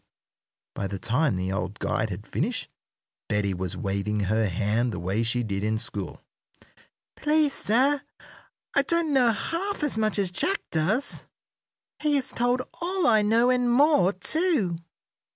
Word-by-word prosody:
By 100 - -3
the 100 - -5
time 125 +4 +1
the 95 +1 -2
old 95 +2 -3
guide 110 - -1
had 100 +2 -6
finished - - -2 0.6
Betty 105 -1 0
was 90 -1 -3
waving 100 +2 -2
her 110 +3 +1
hand 105 +6 0
the 95 - -5
way 95 +5 -1
she 120 +1 0
did 100 -2 -3
in 110 +1 +1
school. 105 -4 -5 0.9
"Please, 300 -1 +2
sir, 270 +7 +2 0.7
I 280 - +6
don't 330 +1 +1
know 250 -4 +5
half 340 - -3
as 285 -7 0
much 215 -1 +1
as 195 -3 +1
Jack 380 - +1
does. 195 - -1 0.7
He 300 -1 +1
has 275 -2 -1
told 245 +1 +1 0.2
all 365 0 0
I 220 -3 +5
know, 230 +4 +3
and 250 -1 +2
more, 270 - +4
too." 210 - +1
190 Hz, 150 wpm, -26 LUFS, -, 0.9 s, I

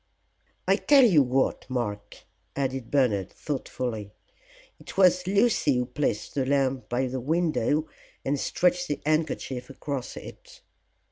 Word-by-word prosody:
I - - +4
tell 280 -3 +6
you 175 -10 +6
what, 130 0 0
Mark," 105 -5 -4 0.3
added 135 -3 -2
Bernard, 110 -9 +1
thoughtfully, 125 -7 -4 0.7
"it - - -11
was 180 -1 +4
Lucy 200 - +3
who 125 - 0
placed 125 -4 -2
the 135 - 0
lamp 130 -3 0
by 125 +2 0
the 130 +1 -3
window 155 0 +1 0.4
and 140 +1 0
stretched 180 +3 +1
the 145 - -2
handkerchief 150 -5 -1
across 135 -1 -5
it." - - -12
135 Hz, 130 wpm, -26 LUFS, 125-155 Hz, 0.7 s, tell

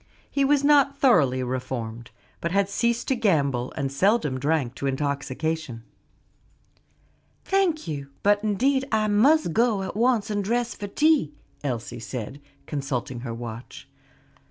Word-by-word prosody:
He 280 - +1
was 285 0 +3
not 280 -1 +4
thoroughly 140 - +3
reformed, 120 -2 -4 0.3
but 170 - -2
had 200 +1 +2
ceased 235 +4 0
to 265 - +3
gamble 140 - +1
and 135 -2 -2
seldom 150 - +1
drank 140 -3 0
to 140 +2 -4
intoxication. 140 -1 -2 1.6
"Thank 370 - +1
you; 140 -3 -5
but 205 +1 +3
indeed 265 +6 +1
I 215 -1 +2
must 220 - +3
go 225 -3 +2
at 190 - -5
once 230 -2 +2
and 205 -1 -1
dress 240 +3 -1
for 205 - -6
tea," 300 +6 +2 0.3
Elsie 120 -4 -4
said, 125 +4 -6 0.2
consulting 135 -4 -3
her 120 -1 -5
watch. 115 0 -8
170 Hz, 135 wpm, -25 LUFS, -, 1.6 s, not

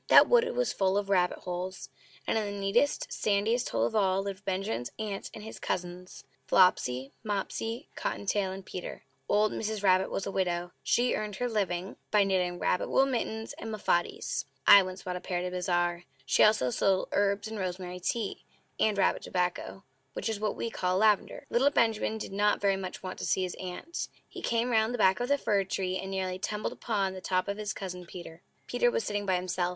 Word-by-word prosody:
That - - +8
wood 480 -1 +4
was - - +1
full 190 0 +2
of 200 -1 -1
rabbit 180 -2 +3
holes; 180 +1 -5 0.4
and - - 0
in 220 -1 +1
the - - -5
neatest, 205 +9 +1
sandiest 215 +4 +1
hole 115 0 +1
of 120 - -2
all 195 -2 +2
lived 200 0 -5
Benjamin's 185 - -2
aunt 210 -3 -4
and 215 - -9
his 220 - -8
cousins 180 0 -4 0.2
Flopsy, 135 -8 +3
Mopsy, 225 +4 -3
Cotton - - -3
tail, 195 -1 +1
and 190 0 -8
Peter. 180 - -7 0.3
Old 210 +1 +3
Mrs. 215 -1 -3
Rabbit 185 -1 +4
was 195 - -3
a - - -3
widow; 175 -2 -1
she 245 +1 +2
earned 210 -1 -3
her 245 +4 -1
living 195 -4 -2
by 210 -1 +4
knitting 180 -2 0
rabbit 180 - 0
wool 270 - +4
mittens 225 -4 -2
and 225 - -5
muffatees 200 -5 -1 0.2
(I 200 - +10
once 185 0 -6
bought 180 -1 -3
a - - -8
pair 180 -1 -2
at 175 - -2
a 180 - -3
bazaar). 175 -1 0 0.2
She - - +4
also 215 - +4
sold 190 +7 +1
herbs, 200 +1 +1
and 220 -1 -5
rosemary 180 -1 -4
tea, 210 +3 -2 0.4
and 215 -2 +2
rabbit - - +2
tobacco 180 +2 -2 0.3
(which - - -3
is 220 -2 -2
what 210 -1 -1
we 230 - -3
call 180 -2 0
lavender). 210 0 +2
Little 265 +4 +4
Benjamin 225 -4 +1
did 210 - -6
not 205 +1 +2
very 200 -1 +2
much 190 -1 -6
want 185 0 -6
to - - -3
see 190 - +1
his 180 - -3
Aunt. 185 - -5 0.2
He - - -9
came 235 +1 0
round 220 +1 +2
the - - -3
back 190 -3 +4
of 245 - -1
the 285 +1 +3
fir 205 -7 +1
tree, 185 -1 -2
and 190 - -5
nearly 185 -1 -2
tumbled 210 +2 -2
upon 200 -4 -1
the 185 - -8
top 185 0 0
of 200 0 -2
his 210 -1 -3
Cousin 180 -3 -6
Peter. 175 -2 -10 0.2
Peter 485 - +2
was 475 -1 -1
sitting 205 -1 -2
by 185 - +3
himself. 180 0 -1
195 Hz, 210 wpm, -29 LUFS, 180-215 Hz, 0.4 s, I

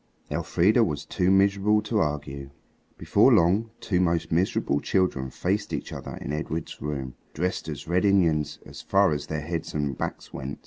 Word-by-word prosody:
Elfrida 105 +7 +3
was 75 -6 -2
too 90 -1 0
miserable 100 +2 +4
to 105 0 0
argue. 70 -4 -3 0.5
Before - - +4
long 95 +7 +3
two 90 -4 0
most 85 -2 +1
miserable 80 -4 +1
children 80 -9 0
faced 100 +9 -2
each - - -4
other - - -7
in 70 - -5
Edred's 80 +1 -3
bedroom, 70 -3 -5 0.2
dressed 90 0 -2
as 75 0 -6
Red 90 +2 +1
Indians 80 -7 +2
so - - -11
far 100 -2 +4
as 75 0 -3
their 75 -1 -3
heads 80 +1 -4
and 70 -3 -1
backs - - -5
went. 70 +1 -5
85 Hz, 170 wpm, -26 LUFS, 75-95 Hz, 0.5 s, miserable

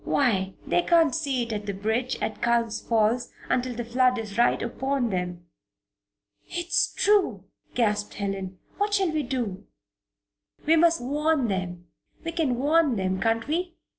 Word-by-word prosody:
Why, 195 -8 +1
they - - +2
can't 335 -4 +4
see 280 -6 0
it 230 -1 -4
at 210 -1 -4
the 200 - -2
bridge 220 +6 -1
at 215 - -3
Culm 235 -1 +2
Falls 225 +2 +1 0.2
until 250 -1 0
the 240 0 -4
flood 250 +1 +2
is 215 -3 -5
right 240 +2 +3
upon 260 0 -1
them." 180 -1 -3 1.0
"It's 345 0 0
true!" 380 - +2 0.3
gasped 210 -3 0
Helen. 195 -2 -4 0.2
"What 410 0 +1
shall 380 -4 +2
we 310 -1 0
do?" 240 -8 -4 1.0
"We 320 +2 +5
must 335 -1 +4
warn 295 -1 +1
them 180 -2 -3 0.4
we 330 - -2
can 310 -8 0
warn 295 0 +3
them, 190 -1 -1
can't 225 +1 +1
we?" 345 +3 -2
240 Hz, 155 wpm, -26 LUFS, 210-300 Hz, 1.0 s, We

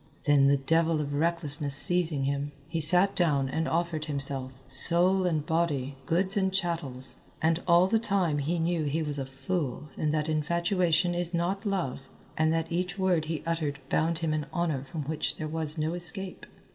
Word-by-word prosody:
Then 145 -2 +4
the 140 0 +4
devil 165 +3 +1
of 145 -1 -3
recklessness 150 -2 +1
seizing 160 -2 +4
him, 140 +1 -2
he 165 0 -3
sat 180 +5 +4
down 145 -6 +1
and 160 +4 -2
offered 165 -2 -1
himself, 135 -3 -4
soul 180 +7 +4
and 155 -4 -1
body, 155 -5 -1
goods 185 +4 +2
and 190 -2 +1
chattels. 165 -9 -3 0.2
And 165 +2 +1
all 170 +1 +5
the 220 +4 +1
time 195 -9 +1
he 160 +5 -1
knew 165 -1 -1
he 155 +3 -1
was 145 -2 -4
a 135 - -4
fool 135 +1 -4
and 150 - 0
that 155 0 -1
infatuation 170 +2 +1
is 175 0 -2
not 190 +4 -2
love, 180 -10 -2 0.3
and 155 0 +2
that 165 0 -2
each 180 +2 -2
word 180 -5 +1
he 160 -1 -4
uttered 160 -4 -2
bound 165 +1 +1
him 155 - 0
in 150 -2 -3
honour 160 -6 -1
from 150 +3 -6
which 155 +2 -2
there 155 - -4
was 155 0 0
no 155 +2 -1
escape. 175 +2 -3
160 Hz, 185 wpm, -28 LUFS, 145-175 Hz, 0.3 s, all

